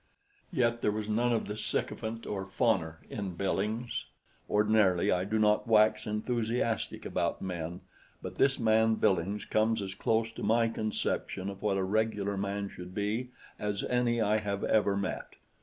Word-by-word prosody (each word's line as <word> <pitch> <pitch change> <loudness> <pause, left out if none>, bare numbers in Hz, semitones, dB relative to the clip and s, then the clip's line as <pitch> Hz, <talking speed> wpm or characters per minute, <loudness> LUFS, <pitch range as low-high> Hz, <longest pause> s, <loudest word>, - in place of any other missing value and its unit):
Yet 120 -7 +1
there - - +2
was 105 0 -3
none 120 +3 +2
of 115 - +1
the 105 - -4
sycophant 110 +1 -3
or 100 -2 -3
fawner 85 -6 0
in 100 -4 -4
Billings; 105 +5 -2 0.4
ordinarily 105 -4 +3
I 90 +1 +1
do 110 +2 0
not 105 +2 +3
wax 110 -1 +4
enthusiastic 115 +1 -1
about - - -1
men, 85 -1 -4 0.4
but - - -7
this 135 0 +3
man 110 -1 +3
Billings 95 +1 +1
comes 110 +1 +2
as 95 -1 -4
close 110 +3 0
to - - -9
my 115 +1 +3
conception 105 -3 -2
of 100 - -11
what 100 -2 +1
a 95 - +1
regular 105 0 0
man 100 +1 -2
should 90 -1 -10
be 110 +5 -1 0.3
as 105 -1 -2
any 125 -1 +1
I 110 -1 +3
have 100 -2 -2
ever 105 -2 +2
met. 100 -2 -4
105 Hz, 160 wpm, -30 LUFS, 100-115 Hz, 0.4 s, wax